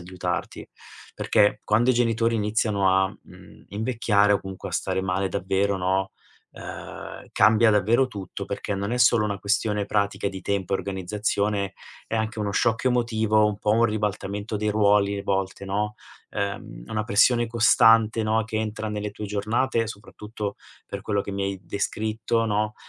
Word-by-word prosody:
aiutarti. 90 0 -4 0.5
Perché 105 0 +2
quando 115 +4 +3
i - - +2
genitori 115 -1 +1
iniziano 105 -2 +1
a, 95 0 +4
mhmm, - - -16
invecchiare, 105 -2 +2
o 100 - +2
comunque 95 0 -7
a - - -12
stare - - -1
male 95 +1 -1
davvero, 95 +2 0
no, 95 +1 0 0.4
ehm, - - -9
cambia 110 +2 +5
davvero 110 +6 +3
tutto, 100 -2 -7
perché 100 0 -4
non 100 +2 -3
è 125 - 0
solo 120 -3 +5
una 100 -1 -2
questione 105 0 0
pratica 100 -1 0
di 95 -1 -7
tempo 100 -2 -2
e - - +4
organizzazione, 100 +1 -2 0.3
è 115 - -1
anche 110 0 -2
uno 105 - -1
shock 115 +3 +1
emotivo, 110 -3 +2
un 105 -1 -2
po' 105 - 0
un 115 +2 +4
ribaltamento 105 -1 -2
dei 105 +1 -1
ruoli, 100 -1 +3
a - - -5
volte, 95 0 -2
no, 105 +2 -2 0.4
ehm, 100 -12 -4
una 110 -1 -2
pressione 120 +4 +4
costante, 115 -1 +4
no, 110 +1 +2
che 110 0 -5
entra 110 0 -3
nelle 105 0 -3
tue 105 - -6
giornate, 115 +4 0
soprattutto 105 0 -7 0.3
per - - -6
quello 100 -2 -1
che 100 - -6
mi 100 0 -2
hai 95 -1 -3
descritto, 110 +2 -1
no, 105 0 0
105 Hz, 165 wpm, -25 LUFS, 100-110 Hz, 0.5 s, cambia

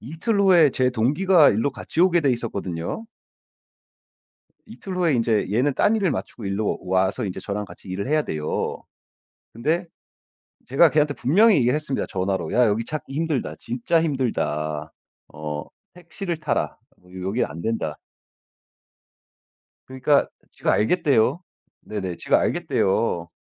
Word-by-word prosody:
이틀 170 - -1
후에 175 -7 +6
제 125 0 +1
동기가 150 +8 +4
일로 115 +7 0
같이 160 - -4
오게 175 -1 +5
되어 140 -4 +2
있었거든요. 100 - -4 1.6
이틀 190 -2 -8
후에 170 -6 +2
이제 115 -3 +1
얘는 130 +5 +2
딴 215 - +3
일을 195 -6 +1
마치고 115 - -5
이리로 100 +2 -1
와서 95 +5 +1
이제 95 - -4
저랑 105 0 -4
같이 100 - -14
일을 100 +5 -4
해야 155 +1 +2
돼요. 75 - -3 0.7
근데 160 +10 -1 0.8
제가 145 +6 +5
걔한테 150 -1 +2
분명히 200 - +4
얘기를 125 0 +3
했습니다 150 -3 -2
전화로. 95 -3 -2
"야 125 0 +4
여기 110 +2 0
찾기 150 -3 -6
힘들다. 145 - -2
진짜 125 +8 0
힘들다. 80 - -2 0.4
어 75 -1 -5 0.3
택시를 175 +1 -5
타라. 155 -2 -2 0.3
어 90 - -22 0.2
여기 100 +6 0
안된다." 85 +10 -3 1.9
그러니까 130 +2 +2 0.2
지가 - - -1
알겠대요. 140 - +2 0.4
네네. 95 -5 -5
지가 - - +2
알겠대요. 95 -4 0
125 Hz, 295 characters per minute, -23 LUFS, 100-160 Hz, 1.9 s, 후에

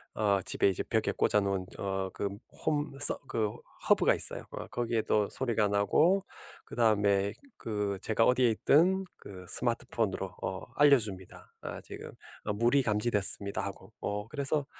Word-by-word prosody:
어 100 -2 +1
집에 - - +2
이제 95 - -2
벽에 - - 0
꽂아 105 - +2
놓은 100 -2 -2
어 95 -1 -3
그 100 - -3 0.4
home 145 -2 -1
서 145 - +5
그 105 -2 -1 0.4
hub가 - - +4
있어요. - - 0
어 - - -7
거기에도 115 -3 -1
소리가 115 -5 0
나고 155 - +2 0.4
그다음에 100 -3 +1 0.2
그 105 -3 -3
제가 115 +1 +2
어디에 125 -1 +3
있든 185 - +2
그 95 -2 -11
스마트폰으로 110 -6 -1
어 95 0 -4
알려줍니다. 110 -11 +1
아 - - -7
"지금 - - -10 0.4
물이 120 +5 +2
감지됐습니다." 105 -2 +3
하고. 100 +1 -9
어 105 +1 -4
그래서 140 +1 -1
105 Hz, 315 characters per minute, -30 LUFS, 100-125 Hz, 0.4 s, 서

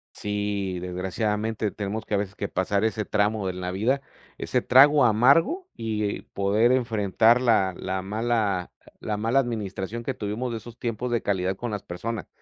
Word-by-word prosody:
Sí, 100 -2 -2
desgraciadamente 105 +4 -2
tenemos 105 +2 -4
que, - - -5
a - - +4
veces, 100 0 -3
que 100 - -3
pasar 100 +2 0
ese 110 -1 0
tramo 105 -1 0
en 90 0 -5
la 90 0 -3
vida, 120 +9 0 0.4
ese - - -1
trago 140 +2 +6
amargo 140 - +4
y 105 -2 -2
poder 105 +5 +1
enfrentar 115 -1 +3
la 110 -6 +3
la 95 0 -3
mala 105 -3 -1 0.3
la 105 -1 -3
mala 115 +5 +2
administración 110 -2 -3
que 135 - -2
tuvimos 115 +2 -3
de 115 - -3
esos 120 +1 -12
tiempos 120 +1 -3
de 120 - 0
calidad 95 -1 0
con 120 +4 -5
las 105 -2 -3
personas. 105 +6 -5
105 Hz, 170 wpm, -25 LUFS, 100-120 Hz, 0.4 s, trago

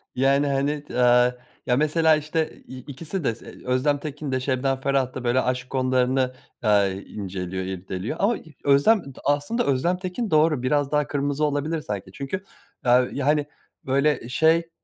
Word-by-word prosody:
yani 140 +2 +3
hani 140 +2 -1
d, 125 - -3
aaa, 125 0 +4 0.3
ya 125 - +2
mesela 155 +2 +4
işte 155 +1 -1 0.2
i 130 - -9
ikisi 155 +7 -6
de 115 - 0
se - - -12
Özlem 130 +3 +1
Tekin 145 -1 -5
de 130 - +1
Şebnem 130 +1 0
Ferah 135 -2 0
da 130 - -6
böyle 125 +2 +2
aşk 125 0 -2
konularını, 130 0 +1 0.3
aaa, 105 -2 +4
i 95 +1 -5
inceliyor, 95 -2 -4
irdeliyor 95 - -5
ama 215 +4 +2
e - - -13 0.2
Özlem 145 +10 +4 0.2
aslında 145 +12 +1
Özlem 145 +7 +1
Tekin 185 +5 -4
doğru 155 -4 +3
biraz 145 +1 +1
daha 150 -1 +1
kırmızı 145 +1 -1
olabilir 150 +2 -1
sanki 100 -6 -5
çünkü, 140 - -5 0.4
aaa, 125 0 +5 0.2
hani 145 0 +2 0.4
böyle 140 -1 +1
şey, 160 +5 +3
140 Hz, 165 wpm, -24 LUFS, 125-150 Hz, 0.4 s, aaa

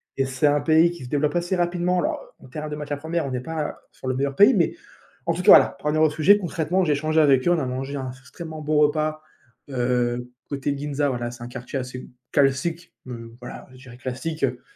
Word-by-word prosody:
et 135 - +1
c'est 135 +2 +1
un 145 0 +3
pays 160 +3 +4
qui 170 -6 -9
se 125 - -8
développe 150 +2 0
assez 175 +2 0
rapidement, 175 0 +1
alors - - -1 0.2
en - - -15
termes 150 +4 -6
de - - -3
matières 150 -1 -4
1res, 160 +2 -2
on 135 - -5
n'est 125 - -2
pas 160 +2 -4
sur - - -10
le 130 - 0
meilleur 140 +1 -1
pays, 205 - +7
mais 170 -5 +2 0.5
en - - +2
tout - - -3
cas, - - +8
voilà, - - +9
pour - - -14
en - - +3
revenir 155 +1 +2
au - - -1
sujet, 160 +7 +5
concrètement, 175 0 0
j'ai 150 - +2
échangé 155 +2 +2
avec 135 -2 +4
eux, 175 - +5
on 170 - +3
a 135 - -1
mangé 135 +3 -4
un 130 -1 -4
s 130 - -13
extrêmement 155 +5 -9
bon 150 0 0
repas, 155 +1 +1 0.5
heu, 125 -1 -1 0.2
côté 140 0 -2
Ginza, 145 0 -1
voilà, 120 -2 -3
c'est 120 0 -10
un - - -6
quartier 125 +2 -6
assez 125 0 -7 0.2
classique, 145 +5 +1
heu, 115 -2 -8
voilà, 120 - -9
je 130 - -14
dirais 125 -1 -12
classique, 135 +5 -5
heu, 125 -2 0
145 Hz, 245 wpm, -24 LUFS, 130-160 Hz, 0.5 s, voilà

